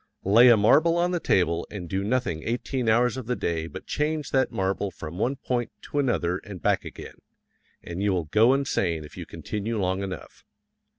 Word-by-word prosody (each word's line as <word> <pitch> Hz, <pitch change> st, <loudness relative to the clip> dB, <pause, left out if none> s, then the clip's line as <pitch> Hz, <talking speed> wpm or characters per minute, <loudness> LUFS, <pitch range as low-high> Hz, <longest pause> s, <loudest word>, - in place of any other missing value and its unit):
Lay 115 Hz, +6 st, +7 dB
a 115 Hz, -, +7 dB
marble 155 Hz, +11 st, +4 dB
on 175 Hz, +1 st, +1 dB
the 175 Hz, -, 0 dB
table 85 Hz, -, +1 dB
and 95 Hz, -5 st, -7 dB
do 95 Hz, +4 st, -2 dB
nothing 105 Hz, -8 st, -1 dB
eighteen 120 Hz, -, -2 dB
hours 120 Hz, +3 st, +3 dB
of 130 Hz, -4 st, -6 dB
the 125 Hz, -, 0 dB
day 80 Hz, -5 st, -2 dB
but -, -, -9 dB
change 150 Hz, 0 st, -2 dB
that 130 Hz, -1 st, +2 dB
marble 95 Hz, +1 st, -1 dB
from 85 Hz, -1 st, -8 dB
one 130 Hz, +5 st, +1 dB
point 125 Hz, -2 st, -2 dB
to 145 Hz, -, -3 dB
another 95 Hz, -10 st, 0 dB
and 100 Hz, -4 st, -9 dB
back -, -, +1 dB
again, -, -, -10 dB, 0.7 s
and 85 Hz, +2 st, -5 dB
you 100 Hz, 0 st, +2 dB
will 90 Hz, -4 st, 0 dB
go 110 Hz, -, +4 dB
insane 90 Hz, -, -1 dB
if 75 Hz, -, -12 dB
you -, -, -7 dB
continue 110 Hz, +2 st, -4 dB
long 95 Hz, 0 st, 0 dB
enough. 95 Hz, -1 st, -7 dB
105 Hz, 195 wpm, -26 LUFS, 90-130 Hz, 0.7 s, Lay